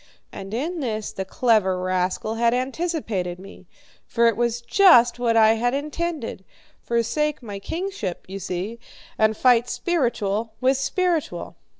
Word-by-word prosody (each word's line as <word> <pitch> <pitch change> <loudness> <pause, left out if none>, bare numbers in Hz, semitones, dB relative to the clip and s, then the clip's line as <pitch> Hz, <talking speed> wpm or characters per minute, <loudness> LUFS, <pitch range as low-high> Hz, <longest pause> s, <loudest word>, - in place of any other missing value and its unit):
And 195 0 -8
in 315 +10 -3
this 220 -6 -3
the 190 - -5
clever 210 -3 +2
rascal 185 +3 -1
had 235 +1 +2
anticipated 255 - -2
me, 195 +2 -13 0.4
for 235 0 +2
it 230 -2 +4
was 235 +1 0
just 245 - +5
what 230 -2 +2
I 220 0 +6
had 245 +3 0
intended 300 - -4 0.4
forsake 275 +5 -1
my 205 -3 -6
kingship, 325 - -4
you 195 +1 -6
see, 195 +5 -4 0.4
and 220 0 +3
fight 245 -1 +4
spiritual 230 - -1
with 260 +1 +2
spiritual. 335 +3 -1
235 Hz, 135 wpm, -23 LUFS, 205-275 Hz, 0.4 s, I